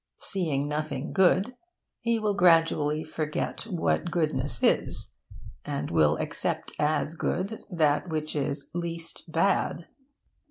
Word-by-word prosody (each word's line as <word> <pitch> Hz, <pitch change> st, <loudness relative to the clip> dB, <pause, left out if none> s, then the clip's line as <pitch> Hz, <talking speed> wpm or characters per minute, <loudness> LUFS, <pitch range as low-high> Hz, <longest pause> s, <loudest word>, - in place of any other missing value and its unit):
Seeing 155 Hz, -7 st, 0 dB
nothing 150 Hz, -2 st, -3 dB
good, 190 Hz, +5 st, +3 dB, 0.4 s
he 235 Hz, -1 st, +1 dB
will 215 Hz, -2 st, 0 dB
gradually 165 Hz, -4 st, +3 dB
forget 155 Hz, +7 st, -3 dB
what 175 Hz, -2 st, 0 dB
goodness 155 Hz, -5 st, 0 dB
is; -, -, +2 dB, 0.5 s
and 145 Hz, -9 st, -4 dB
will 80 Hz, -2 st, +3 dB
accept -, -, -1 dB
as 150 Hz, +1 st, +1 dB
good 195 Hz, +5 st, -2 dB
that 160 Hz, -1 st, +1 dB
which 155 Hz, -1 st, -2 dB
is 140 Hz, 0 st, -2 dB
least 170 Hz, -1 st, -3 dB
bad. 170 Hz, -1 st, +1 dB
160 Hz, 115 wpm, -27 LUFS, 150-180 Hz, 0.5 s, good